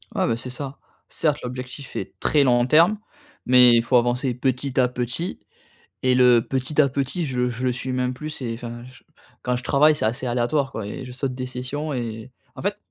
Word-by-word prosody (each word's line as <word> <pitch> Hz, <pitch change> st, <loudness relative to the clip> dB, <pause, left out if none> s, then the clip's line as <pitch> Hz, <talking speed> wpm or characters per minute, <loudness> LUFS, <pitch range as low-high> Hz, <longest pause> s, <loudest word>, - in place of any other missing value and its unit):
Ouais -, -, +2 dB
ben, 115 Hz, -, +1 dB
c'est 125 Hz, +2 st, -7 dB
ça. 135 Hz, +2 st, -7 dB, 0.3 s
Certes 150 Hz, -3 st, 0 dB
l'objectif 125 Hz, +2 st, -7 dB
est -, -, -6 dB
très 145 Hz, -2 st, +3 dB
long 120 Hz, -2 st, +3 dB
terme, 165 Hz, +10 st, +5 dB, 0.5 s
mais 125 Hz, -1 st, +7 dB
il 115 Hz, -, +4 dB
faut 125 Hz, +2 st, +3 dB
avancer 125 Hz, +2 st, +1 dB
petit 130 Hz, +1 st, -1 dB
à 125 Hz, -, +5 dB
petit 125 Hz, +8 st, -2 dB, 0.6 s
et 130 Hz, -1 st, +3 dB
le 125 Hz, -2 st, +6 dB
petit 135 Hz, +3 st, 0 dB
à 140 Hz, -, +5 dB
petit 140 Hz, +6 st, -2 dB
je 130 Hz, -, -4 dB
le 125 Hz, 0 st, +1 dB
je 120 Hz, +2 st, -5 dB
le 125 Hz, -, +2 dB
suis 130 Hz, +1 st, -3 dB
même 125 Hz, 0 st, 0 dB
plus 155 Hz, +4 st, -6 dB
c'est 120 Hz, -6 st, -4 dB
enfin 120 Hz, 0 st, -8 dB
je 130 Hz, -, -17 dB, 0.4 s
quand 125 Hz, 0 st, 0 dB
je 125 Hz, -, -6 dB
travaille 150 Hz, +2 st, +4 dB
c'est -, -, -2 dB
assez 120 Hz, +3 st, -1 dB
aléatoire 125 Hz, +3 st, 0 dB
quoi, 110 Hz, -3 st, -5 dB
et 130 Hz, +6 st, -6 dB
je 125 Hz, -, -9 dB
saute 130 Hz, 0 st, -3 dB
des 130 Hz, 0 st, -4 dB
sessions 130 Hz, +4 st, -4 dB
et 115 Hz, -1 st, -5 dB, 0.2 s
en -, -, -9 dB
fait -, -, -1 dB
125 Hz, 220 wpm, -23 LUFS, 125-140 Hz, 0.6 s, mais